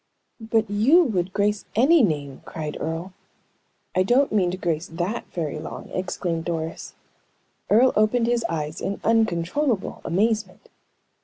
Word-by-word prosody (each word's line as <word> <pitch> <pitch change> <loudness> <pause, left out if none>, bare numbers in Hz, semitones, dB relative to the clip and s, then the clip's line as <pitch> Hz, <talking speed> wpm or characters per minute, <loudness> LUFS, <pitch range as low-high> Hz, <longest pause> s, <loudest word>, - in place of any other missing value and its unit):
"But 225 0 0
you 230 - +5
would 190 - -1
grace 205 +1 0
any 285 +8 +5
name!" 145 - -1
cried 155 -2 -6
Earle. 165 +4 -4 0.8
"I 185 - +2
don't 245 +8 +3
mean 195 -4 +2
to 180 - -4
grace 170 -3 -2
that 175 +7 -3
very 155 -3 -3
long!" 155 - -8
exclaimed 175 -3 -2
Doris. 165 -1 -4 0.7
Earle 245 +5 +5
opened 215 +3 +3
his 240 -1 +1
eyes 155 0 -3
in 200 - -3
uncontrollable 225 - 0
amazement. 215 +5 -1
195 Hz, 135 wpm, -24 LUFS, 165-225 Hz, 0.8 s, you